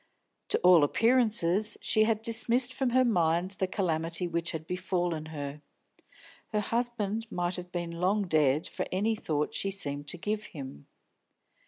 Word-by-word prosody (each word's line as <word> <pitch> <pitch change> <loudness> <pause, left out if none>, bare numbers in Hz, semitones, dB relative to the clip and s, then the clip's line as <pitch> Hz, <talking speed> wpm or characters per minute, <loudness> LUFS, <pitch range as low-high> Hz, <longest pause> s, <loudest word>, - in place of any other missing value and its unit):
To - - +2
all 180 -4 +7
appearances 215 - +2
she 215 0 +2
had 220 -1 0
dismissed 240 +2 +3
from 265 -1 0
her 255 +1 +3
mind 175 -4 +1
the 190 - +1
calamity 170 -2 -1
which 170 0 -2
had 160 -2 -6
befallen 175 -2 -2
her; 145 -2 -6 0.9
her 215 - -1
husband 225 -1 -2
might 175 0 -2
have 180 0 -8
been 175 -1 -4
long 185 +5 0
dead 155 -3 +2
for - - -4
any 210 +4 +1
thought 150 -7 -2
she 195 - -1
seemed 145 -7 -3
to 180 - -2
give 210 +4 -3
him. 130 - -9
180 Hz, 155 wpm, -29 LUFS, 165-215 Hz, 0.9 s, all